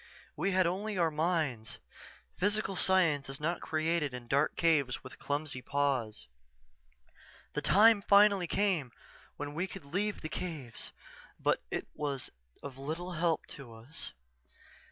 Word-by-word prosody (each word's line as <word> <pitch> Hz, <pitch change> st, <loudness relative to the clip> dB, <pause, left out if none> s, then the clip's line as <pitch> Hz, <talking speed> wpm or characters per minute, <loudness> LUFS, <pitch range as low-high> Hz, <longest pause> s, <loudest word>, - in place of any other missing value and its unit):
We 175 Hz, +6 st, 0 dB
had 185 Hz, -1 st, +3 dB
only 200 Hz, +4 st, -1 dB
our 165 Hz, -2 st, +3 dB
minds 155 Hz, -8 st, -1 dB, 0.6 s
physical 205 Hz, 0 st, +1 dB
science 165 Hz, -8 st, +3 dB
is 135 Hz, +2 st, -4 dB
not 165 Hz, +4 st, -1 dB
created 155 Hz, -3 st, 0 dB
in 120 Hz, -1 st, -8 dB
dark 140 Hz, +4 st, +2 dB
caves 150 Hz, -7 st, +2 dB
with 130 Hz, -, -11 dB
clumsy 145 Hz, -2 st, -2 dB
paws._ 130 Hz, -6 st, -1 dB, 1.3 s
"_The -, -, -1 dB
time 215 Hz, +1 st, +6 dB
finally 200 Hz, -2 st, +5 dB
came 180 Hz, -10 st, +1 dB, 0.5 s
when 145 Hz, 0 st, -5 dB
we 175 Hz, +5 st, -1 dB
could 190 Hz, -5 st, -9 dB
leave 200 Hz, +8 st, -1 dB
the 155 Hz, -, -3 dB
caves 155 Hz, -8 st, -6 dB, 0.5 s
but -, -, +2 dB
it -, -, -3 dB
was 140 Hz, -5 st, -3 dB, 0.3 s
of 135 Hz, -2 st, -8 dB
little 160 Hz, +6 st, -4 dB
help 170 Hz, -1 st, 0 dB
to 130 Hz, -5 st, -10 dB
us. 120 Hz, +8 st, -8 dB
155 Hz, 135 wpm, -32 LUFS, 140-185 Hz, 1.3 s, time